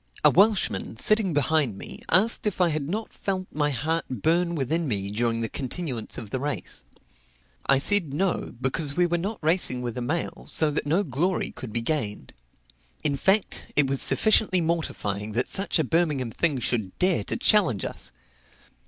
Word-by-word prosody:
A - - +7
Welshman, 190 - +2
sitting 215 - +2
behind 145 -6 +1
me, - - -9
asked 215 +3 +3
if 205 - -2
I 180 -2 +4
had 150 -2 -3
not 215 +4 -4
felt 190 -1 -3
my 150 0 0
heart 155 +4 -1
burn 170 - +1
within 155 +3 -1
me 100 -4 -2
during 115 +1 -1
the 115 - -1
continuance 130 -2 -4
of 105 -3 -8
the 130 - -2
race? 145 - -4 0.8
I 135 - +5
said 170 +1 +2
No; 180 +1 -1
because 140 +3 -1
we 175 - +4
were 175 0 0
not 205 +6 -3
racing 155 -6 +2
with 120 -2 -4
a 125 - -4
mail, 160 +8 -3
so 155 -2 +3
that 145 - -2
no 170 +7 +2
glory 170 +5 -1
could 125 - -8
be 115 +2 -2
gained. 115 -7 -3 0.7
In 145 -2 +1
fact, 190 +8 +1
it 145 - +4
was 135 0 0
sufficiently 215 -4 +3
mortifying 110 - -2
that 125 +3 0
such 195 0 0
a 160 - +2
Birmingham 145 -5 0
thing 150 +3 +1
should 110 -6 -1
dare 185 -1 +2
to - - -2
challenge 200 - +3
us. - - -8
150 Hz, 180 wpm, -25 LUFS, 125-180 Hz, 0.8 s, A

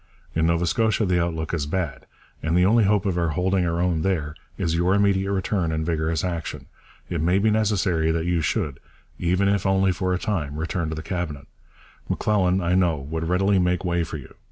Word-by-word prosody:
In 80 0 +2
Nova 85 +1 +2
Scotia 110 +5 +1
the 90 -2 +2
outlook 80 -2 -3
is 75 -4 -1
bad, 85 -4 -3 0.3
and 80 +2 +1
the 90 - +5
only 110 +2 +4
hope 105 0 +2
of 90 -3 0
our 85 - +1
holding 90 +3 +1
our 85 0 -1
own 85 -2 +1
there 80 -5 -1 0.2
is 80 - -1
your 90 +3 +2
immediate 100 -1 +2
return 95 -3 0
and 80 0 -1
vigorous 80 -1 -1
action. 85 -3 -4 0.4
It 85 -3 -2
may 90 +4 +3
be 110 +2 +3
necessary 100 -7 +1
that 80 0 0
you 85 -2 +1
should, 70 0 -1 0.4
even 90 +3 +1
if 100 -1 +1
only 95 -1 +3
for 90 +1 -1
a 90 - +1
time, 85 -9 -2
return 85 +1 -2
to 80 - -3
the 75 - -6
Cabinet. 85 -7 -4 0.6
M'Lelan, 95 -3 +1
I 85 +1 +1
know, 90 -4 +3
would 80 +4 -4
readily 95 +2 +3
make 90 +1 +1
way 85 -1 +1
for 80 -1 -5
you. 70 - -12
90 Hz, 205 wpm, -24 LUFS, 80-95 Hz, 0.6 s, the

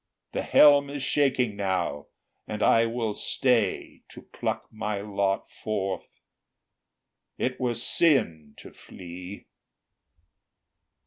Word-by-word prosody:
The - - -2
helm 145 -1 +6
is 140 -1 -5
shaking 130 -7 +1
now, 95 -7 -2 0.4
and 105 0 -3
I 115 0 +4
will 115 -2 -2
stay 115 -3 0
To - - -12
pluck - - -4
my 105 -2 -3
lot 100 -1 -2
forth; 95 -3 -5 1.1
it 125 0 -2
were 125 -2 -1
sin 110 - +1
to - - -12
flee!" 90 +2 -10
110 Hz, 105 wpm, -26 LUFS, 95-125 Hz, 1.1 s, helm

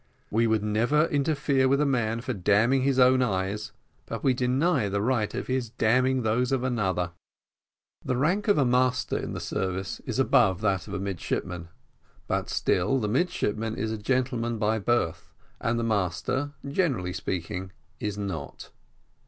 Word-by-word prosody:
We 115 +2 +3
would 110 -2 +1
never 120 +9 +2
interfere 140 -2 +1
with 140 +1 +3
a 150 - +3
man 115 -4 0
for 130 +1 -3
damning 110 +7 +3
his 135 0 +1
own 130 0 +5
eyes, 100 -2 -1 0.4
but - - -5
we 130 - +4
deny 130 - +1
the 100 +1 -1
right 110 -1 +1
of - - -3
his 130 -3 -1
damning 125 +3 +2
those 115 +4 +1
of 130 -2 +1
another. 95 -8 0 0.9
The 130 - -1
rank 180 - +1
of 205 - +4
a 140 - +4
master 125 +1 +1
in - - -3
the - - -4
service 95 0 -3
is 120 - -5
above 115 -8 +3
that 95 -5 0
of - - -5
a - - -2
midshipman, 90 -2 -3 0.6
but - - -1
still 100 +9 +1
the 105 - -1
midshipman 110 - 0
is 110 +1 -2
a 110 - -2
gentleman 120 0 0
by 110 +1 +1
birth, 95 -7 0 0.3
and 115 +1 0
the 115 - -1
master, 110 +7 -1
generally 140 - 0
speaking, 95 0 -4 0.3
is 105 -1 -3
not. 95 -8 -6
115 Hz, 165 wpm, -27 LUFS, 100-130 Hz, 0.9 s, own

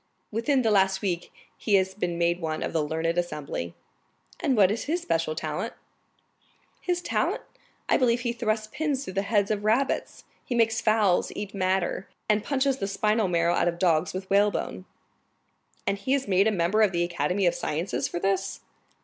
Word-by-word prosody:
"Within 250 +5 +1
the 225 - +2
last 190 -1 +3
week 175 -3 -2 0.2
he 210 - +1
has 190 0 +2
been 180 -3 -2
made 170 +1 +1
one 155 -1 -2
of - - -3
the 160 -2 +1
learned 160 +3 0
assembly." 150 - -4 0.6
"And 260 -4 +1
what 195 -2 +6
is 225 - -3
his 340 +4 -1
especial 165 - 0
talent?" - - -3 1.1
"His 355 -1 -1
talent? - - 0 0.4
I - - +4
believe 245 -2 +2
he 240 -1 -1
thrusts 220 -2 -1
pins 290 -4 -1
through 185 - -7
the 195 - +1
heads 200 0 +1
of 205 -1 -1
rabbits, 235 +6 0 0.2
he 245 - -3
makes 225 -1 +2
fowls 215 -5 +2
eat 205 -1 -5
madder, 185 -1 0 0.2
and 210 0 +2
punches 275 -1 +1
the 195 - -1
spinal 210 +1 +1
marrow 170 -1 +2
out 170 - +2
of 170 0 0
dogs 170 -2 +2
with 190 +1 -5
whalebone." 200 -2 +1 1.0
"And 200 - 0
he 260 +7 +1
is 270 -4 -2
made 195 +1 +4
a - - +3
member 190 +3 +2
of 205 -3 +4
the 170 0 +1
Academy 175 +3 0
of 175 - +4
Sciences 165 +4 -2
for 175 - -4
this?" 195 +1 -1
195 Hz, 185 wpm, -26 LUFS, 175-220 Hz, 1.1 s, what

